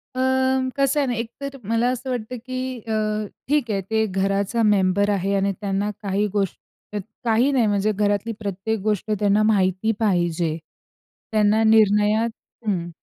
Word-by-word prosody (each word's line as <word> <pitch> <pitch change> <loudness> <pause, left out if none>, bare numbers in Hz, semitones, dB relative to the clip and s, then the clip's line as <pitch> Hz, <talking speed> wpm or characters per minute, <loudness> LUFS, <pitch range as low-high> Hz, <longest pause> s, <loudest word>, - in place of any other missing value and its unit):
अं, 260 0 +1
कसं 275 +1 +2
आहे 275 - +1
ना, 245 - 0
एक 230 0 -3
तर 275 0 -5
मला 230 +2 +2
असं 255 +1 -5
वाटतं, 245 0 -3
की 255 -1 -4
अ, 215 -1 -1 0.2
ठीक 280 -6 +1
आहे 195 -1 0
ते 220 0 +2
घराचा 195 +4 0
मेंबर 200 -1 +3
आहे 200 0 0
आणि 195 0 +1
त्यांना 200 +1 -1
काही 200 +1 0
गोष्ट 195 -3 -1 0.6
काही 235 +4 +3
नाही 250 -5 +3
म्हणजे 205 +1 +1
घरातली 205 +2 0
प्रत्येक 205 +2 -3
गोष्ट 215 0 -1
त्यांना 205 +1 +3
माहिती 195 0 +2
पाहिजे. 175 -5 +1 0.7
त्यांना 215 +1 +3
निर्णयात 215 +1 +4 0.4
हं. 175 -4 -1
215 Hz, 150 wpm, -23 LUFS, 200-235 Hz, 0.7 s, निर्णयात